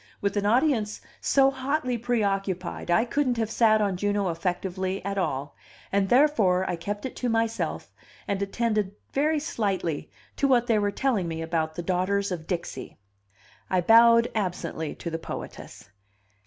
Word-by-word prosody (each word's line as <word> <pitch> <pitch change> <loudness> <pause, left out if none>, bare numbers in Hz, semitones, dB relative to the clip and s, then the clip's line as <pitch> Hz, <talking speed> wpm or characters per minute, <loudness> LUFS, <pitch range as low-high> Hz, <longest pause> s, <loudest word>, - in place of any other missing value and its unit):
With 200 0 -1
an 205 0 +1
audience 230 -3 +2 0.2
so 270 -1 +4
hotly 265 -1 -1
preoccupied 200 -7 -2
I 220 +7 +4
couldn't 255 -1 0
have 225 -1 -1
sat 220 -2 +4
on 195 -3 0
Juno 205 0 0
effectively 185 +2 -3
at 200 0 -1
all, 140 -5 -2 0.4
and 195 -1 +1
therefore 220 -10 +4
I - - -1
kept 205 +6 -5
it 260 - -5
to 250 - -1
myself, 225 0 -1 0.3
and 200 -1 -1
attended 210 -1 -1 0.2
very 305 +3 +2
slightly 195 - -2 0.3
to 280 - +2
what 245 -3 +4
they 225 -3 +2
were 205 0 +1
telling 210 -4 0
me 165 0 -4
about 160 -1 -1
the 175 - -4
Daughters 190 +3 0
of 165 -3 -5
Dixie. 175 -3 -5 0.7
I 185 - +2
bowed 230 +4 +6
absently 175 -6 -3
to 170 - -6
the 165 - -3
poetess. 105 -9 -8
200 Hz, 155 wpm, -26 LUFS, 180-235 Hz, 0.7 s, bowed